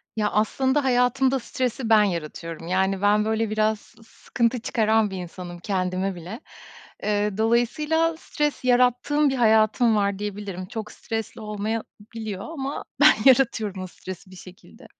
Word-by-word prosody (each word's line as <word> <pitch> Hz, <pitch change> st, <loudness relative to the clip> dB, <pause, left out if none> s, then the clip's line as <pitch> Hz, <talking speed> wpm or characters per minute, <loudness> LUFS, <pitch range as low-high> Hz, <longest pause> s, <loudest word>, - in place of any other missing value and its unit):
Ya, 210 Hz, -1 st, 0 dB
aslında 265 Hz, +6 st, +1 dB
hayatımda 260 Hz, +1 st, +2 dB
stresi 250 Hz, 0 st, -3 dB
ben 215 Hz, -2 st, +6 dB
yaratıyorum. 165 Hz, -2 st, -4 dB
Yani, 190 Hz, +1 st, 0 dB
ben, 210 Hz, +1 st, +3 dB
böyle, 220 Hz, 0 st, 0 dB
biraz 215 Hz, 0 st, +1 dB
sı 225 Hz, -, -21 dB
sıkıntı 235 Hz, +2 st, -2 dB
çıkaran 220 Hz, -1 st, +1 dB
bir 190 Hz, -, -5 dB
insanım 175 Hz, 0 st, -8 dB
kendime 185 Hz, 0 st, -2 dB
bile. 180 Hz, +7 st, -8 dB, 0.6 s
Eee, 210 Hz, -1 st, 0 dB
dolayısıyla 300 Hz, +9 st, +1 dB
stres 295 Hz, -3 st, -2 dB
yarattığım 250 Hz, +4 st, +3 dB
bir 270 Hz, -, -1 dB
hayatım 220 Hz, 0 st, +3 dB
var 200 Hz, -1 st, 0 dB
diyebilirim. 205 Hz, -3 st, -5 dB
Çok 215 Hz, +1 st, -7 dB
stresli 225 Hz, 0 st, -5 dB
olmayabiliyor 215 Hz, -1 st, -5 dB
ama 280 Hz, -3 st, -4 dB, 0.2 s
ben 300 Hz, +1 st, +8 dB
yaratıyorum 225 Hz, -7 st, +3 dB
o -, -, -6 dB
stresi 185 Hz, +1 st, -10 dB
bir -, -, -12 dB
şekilde. 185 Hz, +3 st, -15 dB
220 Hz, 140 wpm, -24 LUFS, 195-245 Hz, 0.6 s, ben